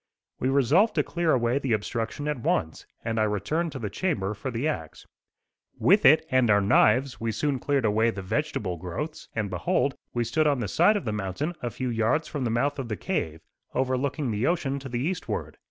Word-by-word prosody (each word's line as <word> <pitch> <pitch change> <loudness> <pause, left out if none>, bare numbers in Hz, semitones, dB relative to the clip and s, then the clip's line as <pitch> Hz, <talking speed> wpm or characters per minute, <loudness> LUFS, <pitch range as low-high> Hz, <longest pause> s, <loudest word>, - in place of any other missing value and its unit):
We 130 - 0
resolved 140 - +3
to - - +3
clear 170 -2 0
away 120 +1 +2
the 135 -4 0
obstruction 115 +6 -2
at 150 -3 -1
once, 80 -8 -1 0.2
and 115 -1 -1
I - - +3
returned 110 - -1
to - - -5
the 105 -6 -4
chamber 105 - -1
for 110 +6 -5
the 125 +4 -1
axe. 80 - -5 0.7
With 200 +4 +4
it 155 +3 +7
and 130 -3 +3
our 100 0 +5
knives 120 +6 +3
we 115 0 0
soon 135 +5 -1
cleared 140 -2 0
away 110 +2 +3
the 100 -4 -5
vegetable 100 - -2
growths, 95 - -6
and 110 -3 -2
behold, 125 +9 +1 0.2
we 120 - 0
stood 150 +7 +1
on 140 -3 +2
the 115 - -2
side 180 - +4
of 200 - -5
the 110 - -1
mountain 105 - -3
a 120 - -2
few 125 +3 -4
yards 115 +8 +1
from 140 -4 -3
the - - 0
mouth 140 +5 0
of 125 -3 -4
cave, 80 -1 -2 0.3
overlooking 130 +1 0
the 105 +3 0
ocean 140 -5 0
to 135 -1 -8
the 120 -1 -2
eastward. 170 +5 -3
125 Hz, 205 wpm, -26 LUFS, 110-145 Hz, 0.7 s, it